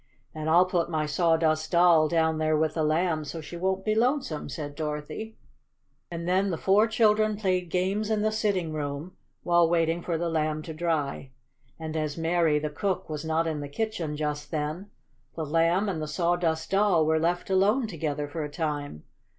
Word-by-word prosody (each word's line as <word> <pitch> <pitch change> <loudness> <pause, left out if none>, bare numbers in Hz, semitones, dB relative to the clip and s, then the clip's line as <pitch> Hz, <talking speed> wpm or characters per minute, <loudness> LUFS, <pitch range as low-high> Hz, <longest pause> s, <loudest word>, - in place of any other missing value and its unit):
"And 155 0 -3
I'll 175 +3 +6
put 175 -2 0
my 155 -2 0
Sawdust 160 0 +1
Doll 170 -2 +5
down 160 -1 +1
there 155 0 +2
with 155 0 +1
the 160 - -1
Lamb 160 +1 +1
so 160 +2 -6
she 160 +2 -8
won't 190 +2 -1
be 215 - +2
lonesome," 235 - 0
said 145 +1 -5
Dorothy. 150 +9 -5 0.7
And 170 0 -5
then 190 +2 +2
the 170 - -2
four 200 +6 +3
children 215 -1 +2
played 185 -4 0
games 195 +5 0
in 215 -1 +1
the 215 - +2
sitting 195 -7 -1
room, 145 +3 -4 0.3
while 170 -1 +4
waiting 165 0 +1
for 170 -1 -2
the 170 +1 -1
Lamb 155 -1 -1
to 160 - -7
dry. 155 -5 -2 0.5
And 160 -1 -5
as 155 -1 -2
Mary, 165 -2 +2
the 150 0 -2
cook, 190 +4 -2
was 150 0 -4
not 160 +1 0
in 160 -2 -2
the 145 -1 -6
kitchen 170 -4 -3
just 150 -1 -3
then, 155 +5 -3 0.5
the 160 - -3
Lamb 165 +6 +2
and 175 -5 -2
the 155 - -3
Sawdust 170 -1 0
Doll 195 -5 +3
were 160 0 +2
left 175 +3 -1
alone 205 +7 +3
together 150 -7 -3
for 155 +2 -4
a 150 - -4
time. 145 - -4
165 Hz, 190 wpm, -27 LUFS, 155-185 Hz, 0.7 s, I'll